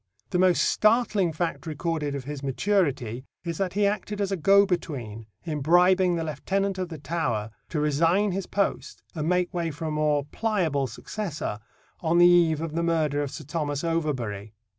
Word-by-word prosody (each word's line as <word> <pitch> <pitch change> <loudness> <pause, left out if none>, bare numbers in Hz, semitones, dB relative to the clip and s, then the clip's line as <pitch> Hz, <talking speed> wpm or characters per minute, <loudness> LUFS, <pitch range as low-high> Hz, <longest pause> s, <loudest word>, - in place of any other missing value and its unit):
The 180 - +1
most 185 -1 +4
startling 215 -5 +2
fact 165 +1 -3
recorded 155 -2 -2
of 140 - -4
his 145 +1 -6
maturity 135 - 0 0.2
is 170 -2 -4
that 190 -2 -1
he 205 +1 +2
acted 210 0 -2
as 200 -1 -1
a - - +1
go 195 +4 +5
between 125 - -4 0.2
in 155 -3 -3
bribing 180 +3 +4
the 165 - -2
Lieutenant 190 +6 -2
of 185 -2 -3
the 160 - -7
Tower 130 -8 -2 0.2
to 155 - -2
resign 165 +7 +2
his 190 0 -3
post 200 -1 -2
and 155 -1 -2
make 180 0 +1
way 170 -2 -1
for 160 +2 -6
a 155 - -2
more 150 -2 +1
pliable 165 -7 0
successor 150 - -5 0.4
on 165 0 +1
the 175 - +7
eve 170 -3 +5
of 165 -2 -4
the 165 - 0
murder 155 -4 +1
of 145 - -2
Sir 155 - -8
Thomas 145 -1 -3
Overbury. 125 -11 -2
165 Hz, 185 wpm, -26 LUFS, 145-180 Hz, 0.4 s, the